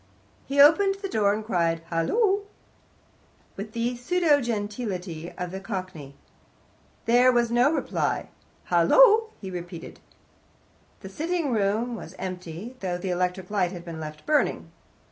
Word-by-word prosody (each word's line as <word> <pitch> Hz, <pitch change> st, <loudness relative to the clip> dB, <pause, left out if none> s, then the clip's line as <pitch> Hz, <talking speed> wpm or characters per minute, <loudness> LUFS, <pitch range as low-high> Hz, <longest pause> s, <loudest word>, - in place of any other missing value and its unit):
He 280 Hz, +1 st, -1 dB
opened 355 Hz, +7 st, +6 dB
the 390 Hz, 0 st, -5 dB
door, 210 Hz, -, +2 dB
and 215 Hz, +1 st, -3 dB
cried 170 Hz, -5 st, 0 dB
"Hullo!" 390 Hz, -, +2 dB, 1.1 s
with 210 Hz, +2 st, -7 dB
the 235 Hz, +1 st, -1 dB
pseudo 300 Hz, +3 st, +2 dB
geniality 205 Hz, -7 st, -4 dB
of 180 Hz, -1 st, -4 dB
the 190 Hz, -, -5 dB
Cockney. 185 Hz, -8 st, -6 dB, 0.9 s
There 245 Hz, +2 st, +5 dB
was 240 Hz, -1 st, +1 dB
no 245 Hz, +4 st, +4 dB
reply. 325 Hz, -, -1 dB, 0.4 s
"Hullo!" 455 Hz, -3 st, +6 dB
he 190 Hz, -2 st, -7 dB
repeated. 175 Hz, -1 st, -8 dB, 1.0 s
The 190 Hz, -, -8 dB
sitting 325 Hz, -, -2 dB
room 220 Hz, +3 st, 0 dB
was 185 Hz, -5 st, -9 dB
empty, 185 Hz, +4 st, -6 dB
though 180 Hz, -2 st, -2 dB
the 180 Hz, +1 st, -3 dB
electric 180 Hz, +1 st, -2 dB
light 190 Hz, -3 st, 0 dB
had 175 Hz, -1 st, -8 dB
been 165 Hz, -2 st, -7 dB
left 155 Hz, -1 st, -8 dB
burning. 300 Hz, +1 st, +1 dB
205 Hz, 135 wpm, -26 LUFS, 180-255 Hz, 1.1 s, opened